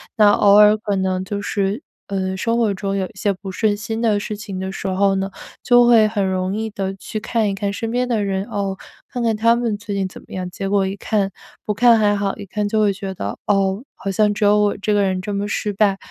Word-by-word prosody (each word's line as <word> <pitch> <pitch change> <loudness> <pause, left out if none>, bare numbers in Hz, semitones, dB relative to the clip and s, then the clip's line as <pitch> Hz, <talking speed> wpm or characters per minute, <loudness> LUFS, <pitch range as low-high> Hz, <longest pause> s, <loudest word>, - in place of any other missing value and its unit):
那 210 -2 +6
偶 200 -1 +5
尔 210 0 +7
可 205 -2 -2
能 190 -1 0
就 205 +1 -4
是， 200 +4 -1 0.3
呃， 190 -1 -2
生 230 +3 0
活 225 -4 +2
中 195 +1 -3
有 190 - 0
一 - - -11
些 205 - 0
不 190 0 -8
顺 210 +2 +1
心 225 +2 -4
的 215 -3 +2
事 210 0 -4
情 200 -2 -7
的 190 0 -4
时 195 - -5
候 195 +1 +2
呢， 195 0 -1 0.3
就 245 0 +5
会 230 -3 +6
很 210 -2 -1
容 185 0 -1
易 220 +1 -2
的 195 -2 -4
去 215 +2 -6
看 220 -1 0
一 195 - -1
看 200 0 -2
身 225 +2 -4
边 250 +1 0
的 225 -4 0
人， 195 0 -2
哦， 195 -2 -3 0.3
看 245 - -3
看 230 -2 +1
他 230 +2 +3
们 230 -3 -1
最 205 -1 -6
近 195 -1 0
怎 185 - -12
么 - - -21
样。 185 -1 -4
结 195 +2 -5
果 195 -1 +2
一 195 - -4
看 200 -1 -1 0.4
不 210 - 0
看 235 +1 +5
还 205 -1 +3
好， 200 +1 -2
一 205 - -8
看 210 +1 -2
就 215 +1 +1
会 205 -2 +3
觉 195 0 -6
得： 100 - -5
“哦， 195 +1 +1
好 195 - -5
像 210 +2 +2
只 210 - -3
有 205 +1 +5
我 205 -1 +1
这 210 +1 -1
个 205 - +3
人 190 -1 0
这 205 +1 -4
么 200 +1 -2
失 210 0 -2
败。” 200 -1 +2
205 Hz, 280 characters per minute, -20 LUFS, 195-215 Hz, 0.4 s, 尔